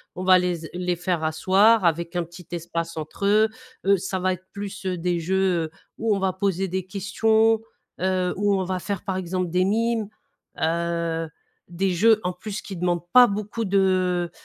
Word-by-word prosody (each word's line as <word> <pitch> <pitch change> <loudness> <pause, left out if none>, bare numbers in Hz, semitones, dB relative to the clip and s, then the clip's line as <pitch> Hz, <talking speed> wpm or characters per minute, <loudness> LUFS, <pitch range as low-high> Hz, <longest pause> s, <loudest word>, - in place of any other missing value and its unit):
on 185 - -5
va 185 0 +7
les 180 -2 -1
s - - -9
les 180 0 -1
faire 175 -1 -2
asseoir 190 +7 +4
avec 170 +1 0
un 175 - +1
petit 175 +1 -13
espace 170 -1 -4
entre 155 +5 -5
eux, 215 +2 +4 0.4
heu, 200 0 +5
ça 190 +1 -3
va 185 0 +1
être 185 +1 -10
plus, 200 -1 -7
heu, 185 -1 -1
des 175 0 0
jeux, 185 0 +1
heu, 155 - -9 0.3
où 220 -2 +1
on - - -2
va 190 -1 +1
poser 190 0 -1
des 185 0 -3
questions, 220 +3 +2 0.4
heu, 185 -1 +1
où 205 0 +2
on 190 - 0
va 185 0 -2
faire 200 0 -4
par 190 -2 -2
exemple 185 0 -2
des 180 +2 +2
mimes, 225 +1 0 0.5
heu, 170 0 -1 0.4
des 185 +2 0
jeux 215 +5 +4
en 180 0 -1
plus 205 +3 -6
qui 195 - -8
demandent 175 0 -1
pas 250 0 +9
beaucoup 210 +2 -3
de, 185 -3 +1
185 Hz, 195 wpm, -24 LUFS, 175-200 Hz, 0.5 s, pas